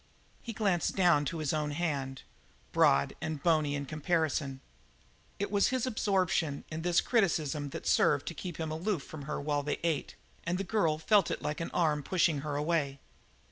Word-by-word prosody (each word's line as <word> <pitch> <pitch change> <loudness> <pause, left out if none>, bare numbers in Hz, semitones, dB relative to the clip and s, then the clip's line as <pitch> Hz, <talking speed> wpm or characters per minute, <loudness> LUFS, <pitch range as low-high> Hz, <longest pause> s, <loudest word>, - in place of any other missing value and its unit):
He 235 - -6
glanced 200 -5 0
down 175 -6 +4
to 165 - -3
his 155 -2 -1
own 150 -1 0
hand, 140 -6 -2 0.5
broad 70 +1 +4
and 160 -1 -2
bony 155 -4 +2
in 140 0 -3
comparison. 155 -2 -1 0.8
It 200 0 -3
was 200 -1 +3
his 255 -1 0
absorption 185 - 0
in 155 +1 -4
this 175 0 +3
criticism 155 - +1
that - - -7
served - - +3
to - - -6
keep 175 -4 -6
him 160 -1 -3
aloof 165 0 -1
from 145 -3 -9
her 150 - -3
while 145 0 0
they 145 +1 -2
ate, 165 -4 -1 0.3
and 170 +2 -1
the 195 - -2
girl 175 -7 +1
felt 200 +5 +3
it - - -3
like 150 +2 -2
an 165 - -3
arm 155 -4 +1
pushing 165 -1 +1
her 145 0 -4
away. 145 -2 0
160 Hz, 180 wpm, -31 LUFS, 145-180 Hz, 0.8 s, down